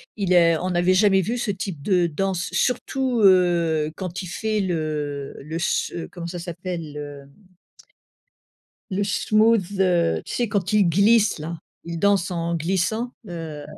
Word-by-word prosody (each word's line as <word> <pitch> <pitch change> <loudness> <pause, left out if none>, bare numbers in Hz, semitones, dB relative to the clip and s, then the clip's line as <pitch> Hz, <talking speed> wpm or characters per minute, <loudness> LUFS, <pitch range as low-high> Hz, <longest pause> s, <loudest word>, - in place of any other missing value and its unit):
Il 195 -3 -2
est 170 -2 +5
on 180 +4 -3
n'avait 180 +1 +2
jamais 195 0 +4
vu 230 +7 -2
ce 235 -3 -1
type 185 -5 -5
de 180 +1 +2
danse 185 +2 -2
surtout, 255 0 0
heu, 170 -5 +3
quand 180 -1 -5
il 185 - -7
fait 215 +4 -1
le 150 -6 -3
le 155 +3 -7
s 170 - 0
heu, 170 - -5
comment 170 -1 -7
ça 175 +1 -6
s'appelle? 170 -2 -6
Le 145 -1 -8 1.7
le 200 +2 0
smooth, 210 0 +2
heu, 170 - +2
tu - - -6
sais 240 - 0
quand 200 -2 -1
il 210 -2 +4
glisse 205 +4 +4
là, 160 +2 -6 0.2
il 170 0 -5
danse 200 -2 +2
en 170 0 -2
glissant, 190 +8 -1 0.2
heu, 165 -4 -6
180 Hz, 160 wpm, -23 LUFS, 165-200 Hz, 1.7 s, est